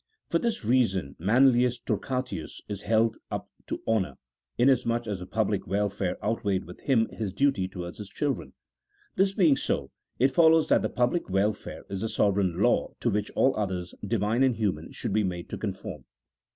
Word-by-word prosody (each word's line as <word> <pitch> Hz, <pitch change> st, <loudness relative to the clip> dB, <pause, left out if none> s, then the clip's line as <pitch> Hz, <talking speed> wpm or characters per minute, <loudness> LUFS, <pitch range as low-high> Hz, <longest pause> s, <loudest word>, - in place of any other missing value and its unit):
For 170 Hz, -, +2 dB
this 230 Hz, -, -2 dB
reason 105 Hz, -, +1 dB
Manlius 125 Hz, +5 st, +4 dB
Torquatus 125 Hz, -, -3 dB
is 100 Hz, -1 st, -5 dB
held 115 Hz, +1 st, +2 dB
up -, -, -5 dB, 0.2 s
to -, -, -4 dB
honour, 95 Hz, -11 st, +1 dB, 0.4 s
inasmuch 120 Hz, -2 st, +3 dB
as 105 Hz, -4 st, -3 dB
the 90 Hz, -, -8 dB
public 105 Hz, -2 st, -1 dB
welfare 100 Hz, -1 st, -1 dB
outweighed 105 Hz, -3 st, 0 dB
with 90 Hz, -, -12 dB
him 115 Hz, -5 st, +2 dB
his 105 Hz, -4 st, -4 dB
duty 120 Hz, -3 st, +1 dB
towards 90 Hz, -1 st, -7 dB
his 105 Hz, -2 st, -7 dB
children. 145 Hz, +4 st, -2 dB, 0.6 s
This 195 Hz, +1 st, +2 dB
being 165 Hz, -8 st, +5 dB
so, 70 Hz, -, -2 dB, 0.3 s
it 130 Hz, +3 st, +4 dB
follows 160 Hz, +2 st, +5 dB
that -, -, +5 dB
the -, -, -1 dB
public 125 Hz, -, 0 dB
welfare 100 Hz, +2 st, -1 dB
is 95 Hz, -1 st, -4 dB
the 110 Hz, -, -1 dB
sovereign 95 Hz, -5 st, +1 dB
law 120 Hz, -, +2 dB
to 120 Hz, -, +1 dB
which 105 Hz, 0 st, -1 dB
all 135 Hz, -, +3 dB
others, 95 Hz, -4 st, -3 dB
Divine 105 Hz, +3 st, 0 dB
and 130 Hz, -3 st, +4 dB
human, 105 Hz, -4 st, -2 dB
should -, -, -4 dB
be 110 Hz, 0 st, +3 dB
made 90 Hz, -2 st, -4 dB
to -, -, -4 dB
conform. -, -, -5 dB
110 Hz, 175 wpm, -27 LUFS, 95-125 Hz, 0.6 s, being